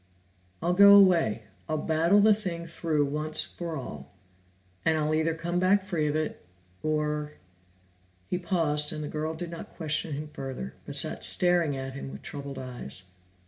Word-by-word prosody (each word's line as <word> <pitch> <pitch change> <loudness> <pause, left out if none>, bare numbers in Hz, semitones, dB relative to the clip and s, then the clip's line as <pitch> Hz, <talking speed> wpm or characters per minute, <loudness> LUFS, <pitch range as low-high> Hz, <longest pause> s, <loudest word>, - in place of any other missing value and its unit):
"I'll 175 - +2
go 200 +2 +9
away. 170 - +5 0.3
I'll 155 - 0
battle 165 +6 +3
the 215 +1 +6
thing 180 -5 -3
through 165 -3 0
once 150 +2 -1
for 170 -2 -6
all, 75 - -7 0.7
and 160 - +2
I'll 155 0 0
either 160 +1 +1
come 170 +2 -2
back 190 +2 +3
free 170 -6 -1
of 150 - -1
it 155 0 -2 0.4
or 150 -1 -1 0.5
" 90 0 -36
He 180 - 0
paused 155 -5 +1
and 150 -1 -4
the - - -4
girl 155 +2 -3
did 170 +1 -6
not 170 - -9
question 155 -1 0
him 150 +2 -5
further, 130 - -6
but - - -4
sat - - 0
staring 175 -5 +2
at 135 0 -5
him 135 0 -7
with - - -10
troubled 140 -1 -6
eyes. 120 - -7
155 Hz, 175 wpm, -28 LUFS, 145-170 Hz, 0.7 s, go